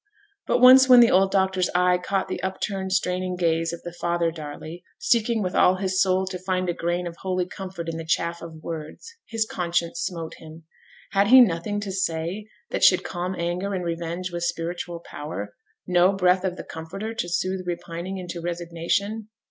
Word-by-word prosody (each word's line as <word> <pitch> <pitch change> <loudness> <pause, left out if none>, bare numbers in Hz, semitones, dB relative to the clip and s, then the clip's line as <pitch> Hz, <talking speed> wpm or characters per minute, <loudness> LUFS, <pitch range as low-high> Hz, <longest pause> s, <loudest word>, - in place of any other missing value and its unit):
But - - +3
once 260 +1 +8
when 250 -1 +9
the 235 -1 +7
old 190 +1 +4
doctor's 190 -2 +1
eye 180 0 +3
caught 195 +1 -1
the - - -4
up 190 0 -3
turned, 190 -2 -3
straining 185 -1 0
gaze 165 -1 +1
of 170 - -8
the 175 - -7
father 170 -1 0
Darley, 155 +2 -8
seeking 235 - +1
with 180 -1 -2
all 185 - +5
his 185 0 0
soul 190 0 +2
to 185 -1 -5
find 185 0 -1
a 175 - 0
grain 175 +1 -2
of 170 -1 -6
holy 185 -1 -1
comfort 185 -2 -7
in 165 0 -3
the 165 - -5
chaff 170 +1 -1
of 160 -2 -10
words, 160 - -7
his 225 -1 0
conscience 170 -3 -2
smote 170 -2 -4
him. 160 +1 -12 0.5
Had 200 0 +3
he 260 +4 +9
nothing 205 -2 +3
to 200 -2 -4
say 185 +2 -2 0.2
that - - -1
should 185 - +6
calm 180 +2 -3
anger 180 +4 -2
and 180 -1 -3
revenge 170 +2 -3
with 175 0 -4
spiritual 170 0 -3
power? 105 -12 -7 0.3
no 180 +1 +4
breath 185 -1 +3
of 185 -1 -2
the - - -6
comforter 195 +8 -6
to 175 -6 -3
soothe 185 +2 -1
repining 175 +2 -4
into 175 -2 -6
resignation? 175 +5 -2
180 Hz, 190 wpm, -24 LUFS, 170-190 Hz, 0.5 s, when